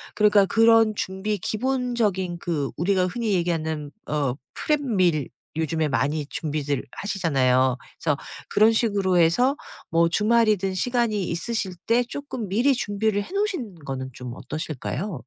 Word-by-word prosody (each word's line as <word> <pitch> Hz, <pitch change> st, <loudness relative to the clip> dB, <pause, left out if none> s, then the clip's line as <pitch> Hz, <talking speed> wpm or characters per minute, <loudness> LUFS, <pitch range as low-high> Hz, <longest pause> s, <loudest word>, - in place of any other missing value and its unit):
그러니까 210 Hz, -2 st, +5 dB
그런 225 Hz, +1 st, +5 dB
준비 195 Hz, +3 st, -2 dB
기본적인 220 Hz, -6 st, -1 dB
그 150 Hz, -6 st, -2 dB
우리가 185 Hz, +2 st, +2 dB
흔히 225 Hz, +2 st, -1 dB
얘기하는 160 Hz, -4 st, -1 dB, 0.2 s
어 145 Hz, -4 st, 0 dB, 0.2 s
프렙밀 190 Hz, -, +1 dB, 0.3 s
요즘에 160 Hz, 0 st, 0 dB
많이 145 Hz, +3 st, 0 dB
준비들 145 Hz, -3 st, -2 dB
하시잖아요. 130 Hz, -10 st, +1 dB, 0.2 s
그래서 145 Hz, -3 st, 0 dB, 0.3 s
그런 215 Hz, +2 st, +5 dB
식으로 200 Hz, -5 st, +1 dB
해서 245 Hz, -, +4 dB, 0.3 s
뭐 165 Hz, 0 st, +3 dB
주말이든 210 Hz, -1 st, +2 dB
시간이 230 Hz, -1 st, 0 dB
있으실 190 Hz, +2 st, -2 dB
때 235 Hz, +2 st, +4 dB
쪼끔 250 Hz, -3 st, -6 dB
미리 240 Hz, +9 st, +3 dB
준비를 205 Hz, -2 st, 0 dB
해 -, -, -13 dB
놓으신 375 Hz, -, -1 dB
거는 130 Hz, -1 st, -4 dB
좀 125 Hz, 0 st, -7 dB
어떠실까요? 155 Hz, +5 st, -4 dB
190 Hz, 315 characters per minute, -24 LUFS, 155-225 Hz, 0.3 s, 그러니까